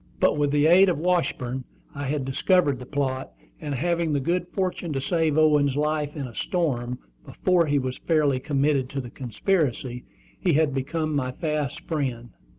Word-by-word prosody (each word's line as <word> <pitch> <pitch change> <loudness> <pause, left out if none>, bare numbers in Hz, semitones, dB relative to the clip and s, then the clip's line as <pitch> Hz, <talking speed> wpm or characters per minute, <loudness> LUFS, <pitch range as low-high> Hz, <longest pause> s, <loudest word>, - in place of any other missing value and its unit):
But, - - +3
with 145 -1 +1
the 145 +1 +2
aid 185 +4 +7
of 175 - 0
Washburn, 150 -7 0 0.3
I 145 0 -5
had 140 -1 -1
discovered 145 +1 +2
the 125 - -9
plot; 135 -2 -2 0.3
and 145 -3 -4
having 170 +2 0
the 140 - +2
good 175 +5 -1
fortune 180 -3 -2
to 135 - -1
save 160 +1 +1
Owen's 150 -3 +4
life 150 0 -1
in 145 -3 -4
a 120 - -9
storm, 125 - -1 0.3
before 175 -3 +1
he 145 0 +2
was 130 -2 -2
fairly 150 -5 +2
committed 140 -1 +1
to 140 - -4
the 120 -3 -7
conspiracy, 130 - -1 0.3
he 175 - +2
had 150 -1 +2
become 155 +3 -2
my 130 -2 -1
fast 150 -1 -2
friend. 130 -7 -3
145 Hz, 175 wpm, -25 LUFS, 130-160 Hz, 0.3 s, aid